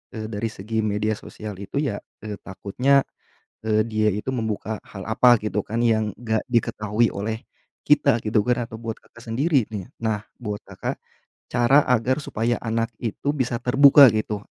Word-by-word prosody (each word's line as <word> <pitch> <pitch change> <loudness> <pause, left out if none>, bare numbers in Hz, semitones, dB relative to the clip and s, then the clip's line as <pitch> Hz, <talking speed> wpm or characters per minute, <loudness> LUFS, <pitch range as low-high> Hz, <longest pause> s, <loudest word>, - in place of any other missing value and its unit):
eee, 110 0 -5
dari 105 +2 -2
segi 110 +2 -4
media 105 0 0
sosial 105 -3 -8
itu 100 - -9
ya, 110 -8 -2 0.2
eee, 105 -1 -6
takutnya, 125 +9 +1 0.6
eee, 110 -1 +1
dia 110 -1 +1
itu 105 +6 -2
membuka 110 -2 -3
hal 95 -2 -8
apa 120 +3 +5
gitu 105 -1 0
kan 115 +4 -2
yang 110 -3 +1
enggak 110 -2 -1
diketahui 110 -1 +1
oleh 110 +5 -4 0.4
kita 140 -5 +4
gitu 105 0 +2
kan 125 0 +1
atau 110 - -7
buat 115 -1 -5
Kakak 115 - -18
sendiri 140 0 +2
nih. 100 -1 -5 0.2
Nah 110 -2 0 0.2
buat 105 -4 -4
Kakak, - - -5 0.5
cara 135 +5 +5
agar 125 +3 +2
supaya 115 0 -1
anak 115 0 -1
itu 125 +5 -2
bisa 125 -3 0
terbuka 140 +2 +8
gitu, 105 -1 -2
110 Hz, 165 wpm, -23 LUFS, 105-120 Hz, 0.6 s, terbuka